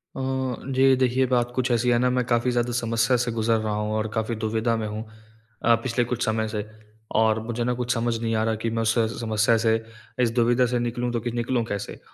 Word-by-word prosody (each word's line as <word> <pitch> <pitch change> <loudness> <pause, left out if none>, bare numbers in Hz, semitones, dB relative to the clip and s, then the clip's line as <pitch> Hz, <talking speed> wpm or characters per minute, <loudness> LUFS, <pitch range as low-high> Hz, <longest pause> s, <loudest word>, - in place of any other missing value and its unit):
अ, - - -6 0.5
जी 130 0 +5
देखिए, 130 0 +2
बात 120 -1 +2
कुछ 130 0 0
ऐसी 120 +1 +2
है 120 - +4
ना 125 0 +2
मैं 125 0 +1
काफ़ी 120 +1 +1
ज़्यादा 120 0 0
समस्या 115 +1 +1
से 120 - -2
गुज़र 115 0 +1
रहा 110 -1 -2
हूँ 105 0 -2
और 110 0 -1
काफ़ी 110 0 -1
दुविधा 110 +1 0
में 110 -1 -3
हूँ 105 +1 -5 0.6
अ, 120 0 +5
पिछले 120 -1 0
कुछ 120 0 -2
समय 110 0 0
से। 105 -1 -4 0.5
और 110 0 +3
मुझे 120 +1 -3
ना 125 +1 0
कुछ 125 0 -1
समझ 115 -1 0
नहीं 115 -1 -1
आ 110 - +1
रहा 110 0 0
कि 115 - +1
मैं 115 0 -1
उस 110 0 +2
स 115 0 -1
समस्या 110 0 +2
से, 110 0 +2 0.4
इस 120 -2 +3
दुविधा 120 +1 +3
से 125 0 0
निकलूँ 120 +1 -2
तो 120 - 0
कि 120 +1 -3
निकलूँ 120 +1 -1
कैसे? 100 -2 -5
115 Hz, 235 wpm, -24 LUFS, 110-120 Hz, 0.6 s, जी